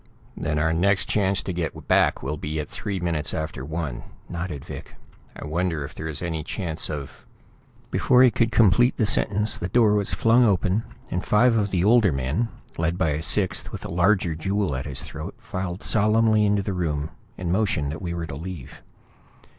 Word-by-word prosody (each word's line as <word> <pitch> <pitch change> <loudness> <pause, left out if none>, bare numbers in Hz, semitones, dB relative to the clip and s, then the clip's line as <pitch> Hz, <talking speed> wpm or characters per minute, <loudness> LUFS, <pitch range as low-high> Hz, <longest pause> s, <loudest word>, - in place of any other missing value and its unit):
"Then 75 -2 -2
our 80 +2 +1
next 95 +4 +3
chance 100 -2 +1
to 95 - -4
get 85 -2 -4
back - - +3
will 70 +3 -2
be 75 +1 -4
at 75 - -3
three 100 -2 -4
minutes 85 -4 -1
after 80 -4 -4
one," 75 -5 -4 0.3
nodded 85 -5 -5
Vic. - - -9 0.4
"I - - -8
wonder 80 0 -1
if 75 - -10
there 80 - -6
is 80 +1 -4
any 80 -2 -2
chance 85 -2 -2
of 70 -3 -7 0.3
" - - -32
Before 125 0 +4
he 125 - +6
could 115 +1 +1
complete 120 +3 +4
the 110 - +2
sentence 105 0 +3
the 90 - -2
door 110 0 +4
was 105 -2 +1
flung 115 +2 +4
open, 100 0 +1 0.3
and 90 - -2
five 115 +3 +3
of 105 -2 +1
the 90 -2 0
older 110 -2 +5
men, 70 - -1 0.3
led 85 +2 0
by 80 - +1
a 75 +1 -1
sixth 95 +3 0
with - - -7
a - - -6
larger 90 0 +2
jewel 95 0 -1
at 65 +3 -4
his 70 -2 -4
throat, 80 +5 -7
filed 95 -1 -5
solemnly 110 0 +3
into 100 -1 +1
the 100 0 -3
room 80 -4 -2 0.3
and 90 -2 -3
motioned 90 -8 0
that 80 - -7
we 85 -2 -4
were 85 -1 -3
to 75 - -8
leave. 85 -3 -8
90 Hz, 200 wpm, -24 LUFS, 80-105 Hz, 0.4 s, he